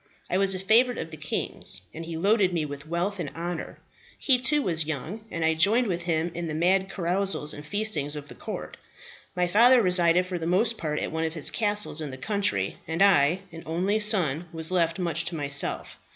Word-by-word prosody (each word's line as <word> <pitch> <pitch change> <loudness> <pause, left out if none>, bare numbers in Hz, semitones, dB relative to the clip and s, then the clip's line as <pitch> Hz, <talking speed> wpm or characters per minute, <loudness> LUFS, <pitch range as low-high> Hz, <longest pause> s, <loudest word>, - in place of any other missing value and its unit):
I 180 - +1
was 195 -1 +4
a - - -5
favourite 230 +6 +3
of 165 - -6
the - - -7
king's, 150 -9 -1
and 165 - -7
he 165 0 -6
loaded 195 +1 +2
me 160 -3 -1
with 145 +1 -9
wealth 175 +4 -2
and 160 -5 -4
honour. 175 +1 -6 0.4
He, 260 -3 +2
too, 295 +3 +2
was 165 -4 +1
young, 160 - -5
and 165 -4 -3
I 160 - +2
joined 205 +10 +3
with 175 -5 -3
him 170 0 -1
in 170 0 -5
the 155 - -4
mad 190 +4 +1
carousals 185 -3 +1
and 145 - -9
feastings 155 -5 -1
of 145 -1 -8
the - - -9
court. - - -8 0.6
My 180 0 +1
father 235 +8 +5
resided 180 -3 +4
for 180 -1 -5
the 165 - -4
most 215 +6 +2
part 155 -6 -4
at - - -3
one 160 0 -3
of 160 +1 -5
his 155 - +4
castles 205 -7 0
in 150 - -5
the 130 - -8
country, 185 - -1
and 165 +4 +1
I, 180 -2 +3
an 165 0 -10
only 185 +6 -1
son, 180 -7 +3
was 160 +1 0
left 170 -2 0
much 170 -3 -1
to 175 - -4
myself. 140 -2 -1
175 Hz, 215 wpm, -25 LUFS, 160-200 Hz, 0.6 s, father